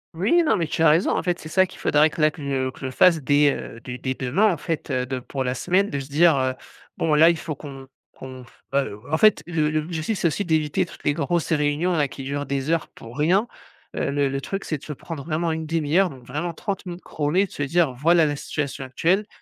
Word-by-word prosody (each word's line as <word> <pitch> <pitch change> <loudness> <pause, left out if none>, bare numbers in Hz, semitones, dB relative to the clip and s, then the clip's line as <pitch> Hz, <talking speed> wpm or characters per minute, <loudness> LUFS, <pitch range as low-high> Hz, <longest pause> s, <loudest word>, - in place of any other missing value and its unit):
Oui, 210 - +3
non, 305 - +2
mais 170 - 0
tu 155 - -3
as 165 - +6
raison, 160 +5 +3
en - - 0
fait, 175 0 -1
c'est 155 - -9
ça 185 +3 +3
qu'il 185 - -14
faudrait 150 +1 +4
que 155 - -10
là 155 0 +4
que 150 - -12
je 135 -2 -1
je 130 - -2
fasse 165 +5 +4
dès, 145 +1 +4
heu, 115 - -8
dès 125 0 -7
dès 130 0 -2
demain, 155 +14 +2
en 170 - -2
fait, 160 +1 -4
heu, 125 0 0
de 130 0 -3
pour 130 +2 -4
la 125 0 -1
semaine 185 +10 +1
de 140 - -2
se 135 - -7
dire, 160 +2 +5
heu: 130 -1 0 0.4
«Bon 160 -2 +1
là, 160 +2 +7
il 170 - +1
faut 155 0 -5
qu'on 135 -2 -10 0.3
qu'on 130 -1 -10
f». 120 - -22
Heu, 135 -7 -1
en 160 - +2
fait, 215 0 +5
le 160 -3 0
le 155 0 0
l'objectif, 165 +6 -3
c'est 170 - +1
aussi 185 +5 -2
d'éviter 155 -3 +1
toutes - - -14
les 145 - +2
grosses 165 +3 -1
réunions 150 +4 +1
là 150 -4 +2
qui 135 - -9
durent 140 +1 -3
des 140 +2 -2
heures 165 -2 0
pour 115 +5 -12
rien, 185 +9 +3 0.5
heu, - - -1
le 140 0 +1
le 135 0 -3
truc 195 +7 -4
c'est 155 - -3
de - - -21
se 150 - -6
prendre 150 0 -8
vraiment 165 +2 -1
une 160 0 -3
1/2 160 -1 -1
heure 195 -2 +3
donc 130 -5 -12
vraiment 170 +6 -3
30 195 -1 -4
minutes 175 +1 -7
chrono 150 +1 -2
et 200 - +5
de 190 - -16
se - - -7
dire: 155 0 +2
«Voilà 165 +6 +3
la 145 -1 -1
situation 140 -2 -4
actuelle, 180 +10 +1
155 Hz, 265 wpm, -23 LUFS, 140-170 Hz, 0.5 s, là